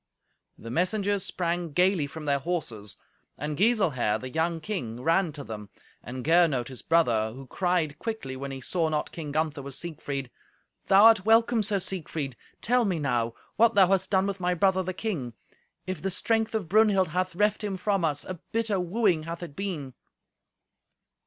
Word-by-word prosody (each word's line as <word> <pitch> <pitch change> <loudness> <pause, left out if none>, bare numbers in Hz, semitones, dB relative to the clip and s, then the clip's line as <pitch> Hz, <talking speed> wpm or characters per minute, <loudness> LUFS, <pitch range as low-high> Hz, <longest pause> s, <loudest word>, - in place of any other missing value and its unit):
The 115 - -9
messengers 195 - +1
sprang 170 -4 -2
gaily 180 -3 +3
from 155 +2 -8
their 140 -1 +2
horses, 125 - -4 0.4
and 150 +1 -3
Giselher, 185 - +2
the 130 0 -7
young 165 +2 0
king, 125 - -5
ran 165 +1 +2
to 145 -1 -7
them, 105 -4 -8 0.3
and 125 +1 -7
Gernot, 160 -7 +3
his 130 -3 -7
brother, 120 -10 +2
who 135 +1 -9
cried 175 0 -1
quickly, 220 - -4
when 140 +1 -5
he 135 -1 -6
saw 165 +4 0
not 150 -1 -2
King 155 -3 -6
Gunther 155 -1 -1
with 140 -1 -6
Siegfried, 140 -6 -4 0.6
"Thou 195 +1 +6
art 225 -4 +7
welcome, 225 +2 +4
Sir 205 0 +2
Siegfried. 160 -8 -3 0.3
Tell 245 +1 +3
me, 190 -6 0
now, 120 -6 -1 0.2
what 230 0 +4
thou 190 -3 +6
hast 190 -1 +2
done 190 -1 +3
with 200 -1 -3
my 180 0 0
brother 190 +2 +3
the 185 0 -3
king. 150 - -3 0.5
If 185 -1 -4
the 195 - -1
strength 225 +4 0
of 205 -6 -2
Brunhild 200 -2 +4
hath 185 +2 -1
reft 210 +2 +1
him 200 -2 -2
from 195 -1 0
us, 150 -3 0
a 185 -2 -6
bitter 220 -3 0
wooing 180 -3 +1
hath 170 +1 -6
it 155 -5 -8
been." 160 -9 -4
170 Hz, 180 wpm, -27 LUFS, 140-195 Hz, 0.6 s, art